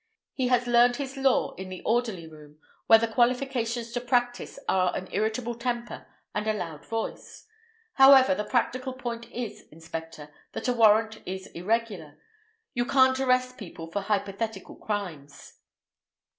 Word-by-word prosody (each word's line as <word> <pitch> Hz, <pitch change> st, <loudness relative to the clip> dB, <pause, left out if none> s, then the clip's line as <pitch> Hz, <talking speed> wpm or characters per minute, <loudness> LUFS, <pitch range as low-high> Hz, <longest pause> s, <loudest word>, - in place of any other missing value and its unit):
He 260 Hz, -2 st, 0 dB
has 245 Hz, -1 st, +2 dB
learned 240 Hz, 0 st, +5 dB
his 275 Hz, 0 st, -5 dB
law 270 Hz, -1 st, +2 dB
in 190 Hz, 0 st, -6 dB
the 185 Hz, -1 st, -8 dB
orderly 225 Hz, -7 st, 0 dB
room, 150 Hz, -2 st, -14 dB, 0.3 s
where 225 Hz, -, +9 dB
the 230 Hz, +1 st, 0 dB
qualifications 240 Hz, 0 st, 0 dB
to 245 Hz, 0 st, -3 dB
practise 245 Hz, 0 st, -1 dB
are 185 Hz, -1 st, +2 dB
an 185 Hz, -, -4 dB
irritable 220 Hz, +4 st, -1 dB
temper 240 Hz, 0 st, -4 dB, 0.3 s
and 210 Hz, +1 st, -2 dB
a 215 Hz, -, +2 dB
loud 165 Hz, -7 st, -6 dB
voice. 225 Hz, -1 st, -5 dB, 0.5 s
However, 270 Hz, -5 st, +7 dB
the 210 Hz, +3 st, -2 dB
practical 255 Hz, +3 st, -1 dB
point 235 Hz, -2 st, -6 dB
is, 240 Hz, -3 st, -6 dB
inspector, 160 Hz, -1 st, -8 dB, 0.2 s
that -, -, -5 dB
the 250 Hz, -, +2 dB
warrant 220 Hz, -1 st, +4 dB
is 190 Hz, +1 st, -5 dB
irregular. 190 Hz, -5 st, -2 dB, 0.6 s
You 240 Hz, 0 st, 0 dB
can't 260 Hz, -1 st, +4 dB
arrest 255 Hz, -1 st, +1 dB
people 165 Hz, -5 st, -9 dB
for 200 Hz, -, -2 dB
hypothetical 200 Hz, +1 st, -3 dB
crimes." 170 Hz, -10 st, -6 dB
225 Hz, 145 wpm, -27 LUFS, 190-245 Hz, 0.6 s, where